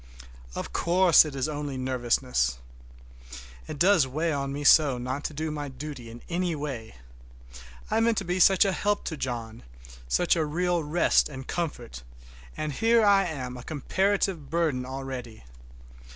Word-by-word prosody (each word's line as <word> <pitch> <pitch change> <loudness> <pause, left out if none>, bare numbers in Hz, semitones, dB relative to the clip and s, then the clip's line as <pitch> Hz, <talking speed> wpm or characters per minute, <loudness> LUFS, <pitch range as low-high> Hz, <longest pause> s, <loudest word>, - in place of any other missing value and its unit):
Of - - -5
course 175 -1 +5
it 150 -2 -6
is 135 0 -1
only 145 -3 -4
nervousness. 125 - 0 1.1
It - - -6
does 175 -4 +4
weigh 155 +5 -1
on 140 -1 -2
me 145 +1 -4
so 145 -3 +5
not 130 +4 -4
to - - -3
do 155 +1 -3
my 145 -1 -4
duty 135 -2 -8
in 115 +1 -11
any 175 -1 -1
way! 135 - -6 1.0
I - - +2
meant 225 -1 +2
to 195 - -1
be 180 +1 -1
such 195 +3 +6
a 195 - +2
help 205 +2 -1
to 160 - -4
John, 120 -5 -5 0.5
such 175 - +2
a 165 - +1
real 175 +2 0
rest 155 +2 +2
and 130 -2 -8
comfort, 145 - -4 0.6
and 155 -1 -3
here 225 +6 +3
I 200 -1 +5
am 130 -6 -5
a 125 - -9
comparative 185 +1 -1
burden 150 -6 0
already! 130 - -7
150 Hz, 160 wpm, -27 LUFS, 130-175 Hz, 1.1 s, such